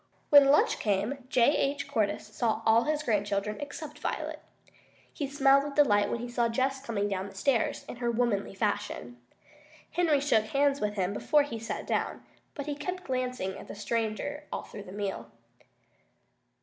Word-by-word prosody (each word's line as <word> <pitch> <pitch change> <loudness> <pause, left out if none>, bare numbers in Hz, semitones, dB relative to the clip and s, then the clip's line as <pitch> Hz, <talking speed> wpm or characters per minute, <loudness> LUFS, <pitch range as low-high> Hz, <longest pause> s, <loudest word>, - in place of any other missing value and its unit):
When 285 -1 +9
lunch 290 - +4
time 205 +2 0
came 270 -2 -15
J. 255 +4 +4
H. 280 0 0
Cordyce 210 -3 0
saw 225 -2 0
all 225 +1 +5
his 300 0 0
grandchildren 205 -3 -1
except 295 +1 -7
Violet. - - -3 0.7
He 285 - -3
smiled 275 0 +4
with 285 -1 -6
delight 205 -9 +4
when 235 - -2
he 245 - -4
saw 240 -1 0
Jess 265 +3 0
coming 210 -5 -1
down 195 -1 -3
the 195 - -15
stairs 235 +3 0
in - - -7
her 240 -1 -1
womanly 230 -5 0
fashion. 205 - -3 0.7
Henry 325 -5 +3
shook 250 -6 +2
hands 280 +3 +1
with 210 0 -1
him 190 -1 0
before 295 +7 +3
he 230 -6 -5
sat 225 - -5
down, - - -2 0.3
but 285 - -5
he 295 - -2
kept 360 +6 -5
glancing 255 -7 -2
at - - -11
the - - -8
stranger 230 +7 -2
all - - -3
through 205 -1 -10
the 185 - -10
meal. 195 - -4
240 Hz, 175 wpm, -29 LUFS, 205-285 Hz, 0.7 s, When